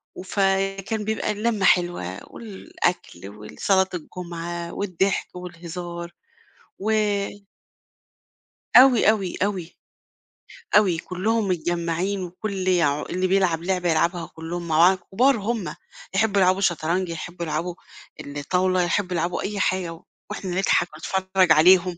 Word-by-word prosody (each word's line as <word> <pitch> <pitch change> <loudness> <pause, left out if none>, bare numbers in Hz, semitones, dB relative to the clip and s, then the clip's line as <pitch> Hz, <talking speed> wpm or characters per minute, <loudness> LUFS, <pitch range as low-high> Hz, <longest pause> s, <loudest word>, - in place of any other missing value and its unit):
وفكان 195 +2 -1
بيبقى 220 0 -1
اللمّة 210 -1 0
حلوة 175 - +1
والأكل 180 - -4
والصلاة 190 - 0
الجمعة 170 0 -6
والضحك 195 -1 -1
والهزار، 175 -1 -7 0.7
و 215 +3 -2 1.9
أوي، 250 -4 +7
أوي، 195 -5 0
أوي. 185 -4 -3 1.0
أوي 185 -6 +3
كلّهم 205 +6 -1
متجمّعين 175 +2 -1
وكلّ 185 +1 -4
يع 150 -5 +2
اللي 185 +1 -1
بيلعب 180 -4 +2
لعبة 180 -1 0
يلعبها 170 +1 +1
كلّهم 170 +1 -5
مع 155 -1 +1
بعض، 185 +2 +6
كبار 255 +5 +4
هُم، 205 -6 -3 0.4
يحبوا 205 -1 +2
يلعبوا 185 +2 +3
شطرنج، 175 0 0
يحبوا 170 +1 -5
يلعبوا 165 +3 -3 0.5
الطاولة 180 +6 0
يحبوا 185 +1 -1
يلعبوا 170 +1 -1
أي 200 0 -3
حاجة، 185 -3 0
و 165 - -15 0.3
وإحنا 195 -3 -5
نضحك 185 -2 +2
ونتفرّج 185 +1 +1
عليهم. 180 +2 +5
180 Hz, 115 wpm, -23 LUFS, 170-195 Hz, 1.9 s, أوي